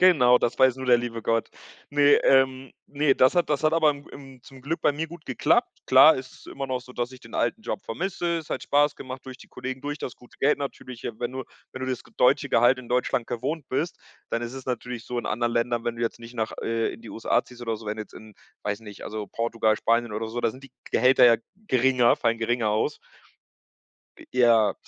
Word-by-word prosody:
Genau, 145 -10 +6
das 120 - -1
weiß 130 -1 +5
nur 130 0 -6
der 125 -1 +6
liebe 115 -1 -5
Gott. 115 +1 0 0.4
Ne, 145 0 +5
ähm, 130 0 +3 0.2
ne, 145 -1 +1
das 130 - +5
hat 175 -3 +1
das 150 +1 0
hat 155 - +4
aber 160 -2 +4
im 145 -1 -8
im 135 -2 -12
zum 135 -2 -14
Glück 160 +5 -3
bei - - +3
mir 160 +3 -4
gut 170 -1 -12
geklappt. 130 - +2 0.2
Klar 135 +5 +8
ist 130 -1 -7
es - - -17
immer 135 -1 -6
noch 130 -1 -1
so, 125 0 -14
dass 120 0 -3
ich 130 - -12
den 115 -2 -14
alten 225 - 0
Job 200 - -4
vermisse. 170 +4 -2
Es 160 - -10
hat - - -3
Spaß 145 +1 +2
gemacht, 130 0 -9
durch 130 0 -9
die - - -15
Kollegen, 130 +1 -6
durch 145 +2 -4
das 125 - -5
gute 125 - -20
Geld 145 +2 +3
natürlich. 130 -3 -7 0.2
Wenn 120 0 -3
du 130 0 -4 0.3
wenn 130 - -8
du 130 - -2
das 125 -1 -3
deutsche 140 +3 +3
Gehalt 125 +1 +4
in 125 -2 -10
Deutschland 125 0 0
gewohnt 130 +5 -4
bist, 155 +6 -2 0.3
dann 115 - -1
ist 120 +1 -5
es 130 -1 -9
natürlich 125 -1 -4
so 125 - -4
in - - -4
anderen 120 +2 -1
Ländern, 120 0 0
wenn 120 0 -2
du 115 - -4
jetzt 115 - -2
nicht 115 +1 -11
nach 110 -2 -2
äh, 115 0 -1
in - - -12
die 115 - -10
USA 115 - +1
ziehst 120 -1 -13
oder 115 -2 -2
so, 110 - -12
wenn 105 +1 -3
du 110 - -4
jetzt 105 - -17
in, 110 -1 -13 0.3
weiß 105 0 -2
nicht, 105 -2 -11
also 105 -1 -5
Portugal, 115 -1 0
Spanien 115 0 +1
oder 110 +1 -3
so, 120 +2 -4
da - - +1
sind 130 - -14
die 140 - -13 0.2
Gehälter 130 +1 +5
ja 120 - +7 0.3
geringer, 130 -1 +4
fallen 115 0 0
geringer 115 0 0
aus. 105 +1 0 1.2
Äh, - - -14
ja 115 -4 +4
125 Hz, 240 wpm, -25 LUFS, 115-135 Hz, 1.2 s, Klar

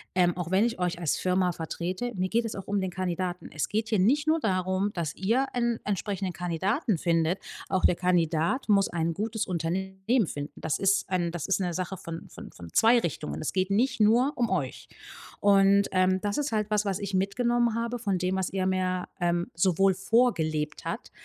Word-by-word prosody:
„Ähm, 175 -1 +3
auch 180 -1 -4
wenn 195 +4 +4
ich 235 -5 -2
euch 175 -1 -1
als 165 -4 0
Firma 180 -1 +1
vertrete, 180 +8 -4
mir 185 0 0
geht 235 +1 +1
es 225 - -4
auch 195 - -7
um 200 -1 0
den 190 - -2
Kandidaten. 180 0 -3
Es 150 - -2
geht 220 +2 -1
hier 215 -4 +2
nicht 285 +10 +3
nur 320 +1 +3
darum, 185 0 0
dass 165 -4 -3
ihr 235 +8 +1
einen 235 -1 0
entsprechenden 195 -2 -2
Kandidaten 190 - -1
findet, 165 +2 +1 0.3
auch 190 - +1
der 180 - +4
Kandidat 175 - +1
muss 200 -2 +4
ein 165 -1 -1
gutes 215 +3 -2
Unternehmen 190 +6 -1
finden. 145 0 -5
Das 160 - -1
ist 195 -1 +2
ein 175 -2 0
das 175 -4 -4
ist 195 0 +1
'ne 175 -2 -1
Sache 185 +2 -3
von 165 -2 -8
von - - -11
von 85 -1 -11
2 235 +2 +5
Richtungen. 80 - -4
Es - - -3
geht 185 0 0
nicht 230 +2 +1
nur 240 +7 +4
um 240 -1 0
euch.“ - - -3 0.5
Und, 200 0 +5
ähm, 185 0 +3
das 205 +3 -1
ist 295 0 -1
halt 215 -1 -1
was, 210 0 +2
was 195 -2 -1
ich 200 -1 -5
mitgenommen 235 +5 +1
habe 235 +1 -2
von 200 -5 0
dem, 185 +1 -1
was 190 -1 -1
er 190 -1 -1
mir, 185 -1 0 0.2
ähm, 175 0 +1
sowohl 190 +3 +3
vorgelebt 180 -8 +1
hat, - - -5
190 Hz, 205 wpm, -27 LUFS, 175-215 Hz, 0.5 s, 2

